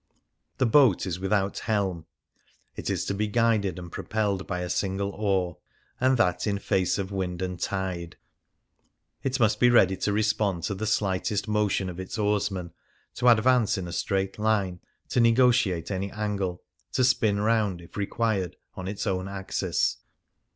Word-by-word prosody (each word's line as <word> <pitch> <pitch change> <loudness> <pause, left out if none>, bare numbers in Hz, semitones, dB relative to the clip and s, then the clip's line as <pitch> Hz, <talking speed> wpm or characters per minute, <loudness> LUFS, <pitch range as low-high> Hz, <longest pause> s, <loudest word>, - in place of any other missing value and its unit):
no - - -50
The - - -45
Lagoon - - -47
The 125 -4 +1 0.2
boat 95 - -4
is 90 -2 -3
without 95 +1 0
helm; 95 -6 -1 0.7
it - - -4
is - - -1
to - - -1
be 105 +2 -1
guided 105 -5 +1
and 85 -2 -8
propelled 100 -3 -2
by 90 -2 -2
a 90 - -3
single 100 0 -1
oar, 95 -5 -1 0.4
and 130 0 +3
that 90 -3 +1
in 100 -1 +1
face 95 -2 0
of 100 -1 -3
wind 95 -2 -3
and 90 -1 -4
tide; 90 -3 -3 1.1
it 135 0 -1
must 110 -2 +3
be 120 - +6
ready 95 -6 +5
to 100 - 0
respond 105 -4 0
to - - -1
the 105 +3 -3
slightest 105 0 0
motion 105 -2 +1
of 90 0 -6
its 95 +4 -5
oarsman, 100 -5 -1 0.4
to 125 - 0
advance 120 -1 +4
in 90 -2 -4
a 85 - -6
straight 95 +1 -1
line, 100 -5 +1 0.3
to - - +1
negotiate 115 -7 +3
any 100 +1 -2
angle, 100 -4 -3 0.3
to 130 - +2
spin 110 -5 +3
round, 105 -4 +1
if 85 - -15
required, 100 -3 -1 0.2
on 95 0 -6
its 100 +2 -4
own 95 -2 -1
axis. 95 -1 -1
100 Hz, 170 wpm, -26 LUFS, 95-110 Hz, 1.1 s, be